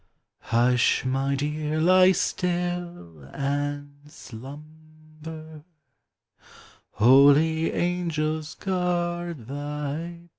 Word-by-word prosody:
Hush! 120 Hz, +2 st, +2 dB
my 135 Hz, +2 st, 0 dB
dear, 150 Hz, +2 st, -2 dB
lie 185 Hz, +3 st, +5 dB
still, 175 Hz, -, -3 dB
and 145 Hz, +1 st, -3 dB
slumber, 155 Hz, +4 st, -12 dB, 1.3 s
Holy 145 Hz, +7 st, +5 dB
angels 160 Hz, -3 st, -2 dB
guard 175 Hz, -, -2 dB
thy 145 Hz, +1 st, -4 dB, 0.2 s
bed 170 Hz, 0 st, -17 dB
155 Hz, 70 wpm, -25 LUFS, 140-170 Hz, 1.3 s, lie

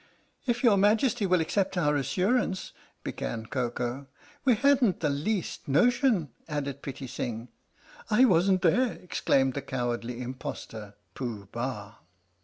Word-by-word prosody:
" -, -, -41 dB
If 240 Hz, 0 st, 0 dB
your 220 Hz, -5 st, +6 dB
Majesty 215 Hz, +2 st, +3 dB
will 180 Hz, -2 st, +3 dB
accept 190 Hz, +3 st, 0 dB
our 150 Hz, -4 st, +2 dB
assurance 190 Hz, -, 0 dB, 0.2 s
" -, -, -37 dB
began 110 Hz, -1 st, -4 dB
Koko. 125 Hz, +2 st, -3 dB, 0.4 s
"We 255 Hz, -4 st, +4 dB
hadn't 260 Hz, -4 st, +3 dB
the 150 Hz, -3 st, +1 dB
least 170 Hz, +7 st, -2 dB
notion 230 Hz, -, +3 dB, 0.2 s
"added 140 Hz, -2 st, -3 dB
Pitti 135 Hz, 0 st, -6 dB
Sing. 120 Hz, -1 st, -5 dB, 0.6 s
"I 225 Hz, +4 st, +6 dB
wasn't 185 Hz, -2 st, +3 dB
there!" 240 Hz, +8 st, +3 dB
exclaimed 135 Hz, -6 st, +1 dB
that 140 Hz, -, -5 dB
cowardly 120 Hz, -1 st, -2 dB
im 125 Hz, +1 st, -4 dB
postor 110 Hz, -5 st, -7 dB, 0.2 s
Pooh 110 Hz, -6 st, -5 dB
Bah. 115 Hz, -3 st, -5 dB
150 Hz, 140 wpm, -28 LUFS, 125-210 Hz, 0.6 s, your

